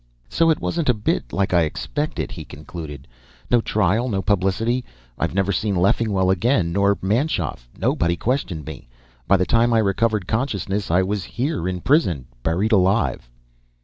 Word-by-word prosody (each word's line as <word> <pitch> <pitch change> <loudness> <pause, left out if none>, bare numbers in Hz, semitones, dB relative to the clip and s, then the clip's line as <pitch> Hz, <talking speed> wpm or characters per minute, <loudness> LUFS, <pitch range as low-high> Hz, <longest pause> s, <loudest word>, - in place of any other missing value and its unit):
"So 165 0 +3
it 160 - +2
wasn't 165 -5 -1
a 125 - +4
bit 105 - -1
like 95 +1 0
I'd 85 -2 +4
expected," 150 - -3
he - - -7
concluded. 75 -1 -9 0.4
"No 120 -1 +5
trial, 110 +4 +1
no 95 -3 -1
publicity. 105 +5 +1 0.4
I've - - -1
never 95 0 +1
seen 100 +2 0
Leffingwell 95 +1 +2
again, 95 -2 +1
nor 100 +1 +2
Manschoff. 105 - -1
Nobody 85 0 +1
questioned 105 - -2
me. - - -9 0.4
By 100 - +5
the 90 - +1
time 115 +2 +3
I - - +4
recovered 105 -1 +1
consciousness, 105 -3 -2
I 90 +3 +3
was 100 0 -2
here 130 - -2
in 90 -1 -3
prison. 90 - +2 0.2
Buried 90 - 0
alive." 95 - +2
100 Hz, 160 wpm, -22 LUFS, 90-115 Hz, 0.4 s, No